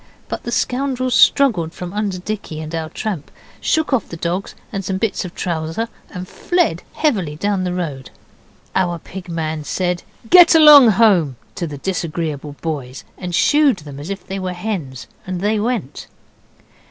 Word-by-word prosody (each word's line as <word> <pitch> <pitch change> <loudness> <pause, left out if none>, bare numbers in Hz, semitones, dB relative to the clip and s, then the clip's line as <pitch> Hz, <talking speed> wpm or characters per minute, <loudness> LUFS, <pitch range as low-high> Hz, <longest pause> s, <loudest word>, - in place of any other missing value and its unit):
But - - -4
the 235 - -3
scoundrels 255 +1 0
struggled 200 - +4
from 180 0 -7
under 205 -3 -1
Dicky 190 -4 -5
and 155 +1 -7
our 160 -1 -3
tramp, 185 -7 -4 0.3
shook 315 -3 +1
off 250 - +1
the 165 - -7
dogs 175 +4 -3 0.2
and 195 -2 -3
some 190 0 -2
bits 220 +1 -1
of 180 - -8
trouser, 170 +6 -2 0.2
and 180 -1 -7
fled 350 - 0
heavily 195 - 0
down 195 +2 -1
the 180 - -1
road. 145 -7 -4 0.6
Our 175 -2 +1
Pig 185 +2 -10
man 160 -2 -3
said, 180 +2 -1 0.3
'Get 350 +4 +8
along 300 -5 +10
home!' 185 - +4 0.2
to 170 - -3
the 145 -2 -7
disagreeable 155 -4 -3
boys, 140 -5 -4
and 180 -2 -4
'Shoo'd' 280 - +3
them 140 -1 -8
as 150 +5 -7
if 195 -2 -5
they 195 +1 -4
were 185 -1 -3
hens, 170 - -4 0.2
and 185 -1 -3
they 210 +3 +1
went. 220 - -3
185 Hz, 165 wpm, -19 LUFS, 160-220 Hz, 0.6 s, along